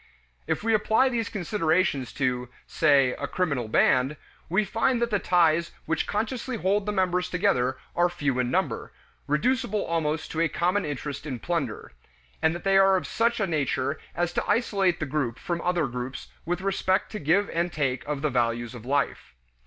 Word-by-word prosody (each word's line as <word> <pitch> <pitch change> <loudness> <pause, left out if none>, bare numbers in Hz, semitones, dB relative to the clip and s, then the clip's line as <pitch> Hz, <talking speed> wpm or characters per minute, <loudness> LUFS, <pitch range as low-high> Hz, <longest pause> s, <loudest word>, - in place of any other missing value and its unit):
If - - -1
we 225 0 +2
apply 220 +4 +3
these 230 -4 -1
considerations 170 - 0
to, 125 -2 -1 0.2
say, 140 -4 +3
a - - -2
criminal 140 -11 -1
band, 130 +6 +3 0.3
we 195 +5 +2
find 235 +5 +1
that 235 0 0
the 205 - +2
ties 170 -2 +2
which 160 - -1
consciously 230 +4 -2
hold 200 +1 0
the - - +1
members 180 -2 0
together 135 -9 +1 0.2
are 175 +1 +3
few 145 -7 -1
in 125 -1 +1
number, - - -1 0.4
reducible 210 - +1
almost 160 -2 -1
to 160 - -1
a 165 - +2
common 180 +5 0
interest 145 0 -5
in 130 -4 -3
plunder; 170 +8 -3 0.5
and 160 +1 +2
that 175 - -7
they 195 0 +4
are 195 0 +5
of - - -4
such 235 +1 +1
a 200 - +2
nature 140 -3 -1 0.2
as 175 0 -1
to - - -2
isolate 195 -7 +2
the 155 - -1
group 135 -5 -2
from 170 -1 -3
other 175 -3 +1
groups 125 +1 -6 0.2
with 175 +1 -1
respect 190 0 0
to 215 - -4
give 175 +7 +2
and 170 +1 0
take 130 -6 -1
of 145 -1 -3
the 150 - +1
values 120 -1 0
of 120 -1 -10
life. 140 - -1
170 Hz, 185 wpm, -26 LUFS, 140-195 Hz, 0.5 s, are